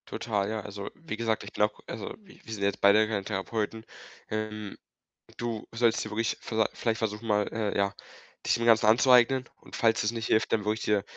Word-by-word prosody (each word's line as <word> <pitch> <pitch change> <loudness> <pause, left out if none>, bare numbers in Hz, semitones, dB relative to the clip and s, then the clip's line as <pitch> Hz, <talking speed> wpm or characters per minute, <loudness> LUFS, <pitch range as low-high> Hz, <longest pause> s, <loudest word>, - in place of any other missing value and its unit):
Total, 105 -3 -2
ja. 110 0 -2
Also, 100 -1 -7
wie 165 -9 -6
gesagt, 115 -1 0
ich - - -10
glaube, 105 0 +1
also 110 - -5
wir 200 -3 -18
wir 110 - -7
sind 105 - -6
ja - - +4
jetzt - - -8
beide 105 +2 +6
keine 105 -2 -2
Therapeuten. 110 +2 -3 0.4
Ähm, 105 -1 -4 0.6
du 115 -2 -3
solltest 115 -1 +2
dir 105 - -7
wirklich 115 +2 -1
viellei 110 -1 +1
vielleicht 115 -2 -1
versuchen 110 0 -3
mal, 105 -1 +2
äh, 110 -2 -2
ja, 100 0 +1 0.5
dich - - +3
dem 115 - -1
Ganzen 115 -1 +5
anzueignen. 125 +2 +5
Und - - -12
falls 115 -2 +2
es 105 - +1
nicht 115 -1 -4
hilft, 110 - +2
dann 110 -2 +2
würde 105 - +2
ich 110 - -8
dir 105 -2 +2
110 Hz, 215 wpm, -28 LUFS, 105-115 Hz, 0.6 s, beide